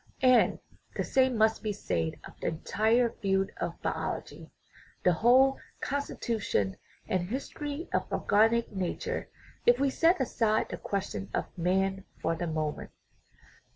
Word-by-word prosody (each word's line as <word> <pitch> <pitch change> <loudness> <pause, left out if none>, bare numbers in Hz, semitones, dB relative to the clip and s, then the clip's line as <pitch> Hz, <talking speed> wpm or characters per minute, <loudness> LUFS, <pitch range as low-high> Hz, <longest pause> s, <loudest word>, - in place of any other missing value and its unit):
And 255 -1 +5 0.4
the - - 0
same 260 -3 +2
must 220 0 +3
be 215 - -1
said 85 - -2
of - - -11
the - - -3
entire 220 +8 +2
field 195 -1 0
of - - -4
biology, - - -4 0.5
the 180 - +5
whole 255 +8 +5 0.2
constitution 225 - -1 0.3
and 180 -1 -1
his 265 +5 -3
tory 295 +3 -5
of - - -1
organic 225 +3 +3
nature, 205 - -3 0.4
if 240 +1 +6
we 275 -1 +2
set 335 +6 +3
aside 225 -4 +1
the - - -4
question 195 0 -3
of - - -3
man 190 +2 0 0.2
for 165 - 0
the 175 +1 -3
moment. 155 -2 -3
220 Hz, 140 wpm, -29 LUFS, 190-255 Hz, 0.5 s, if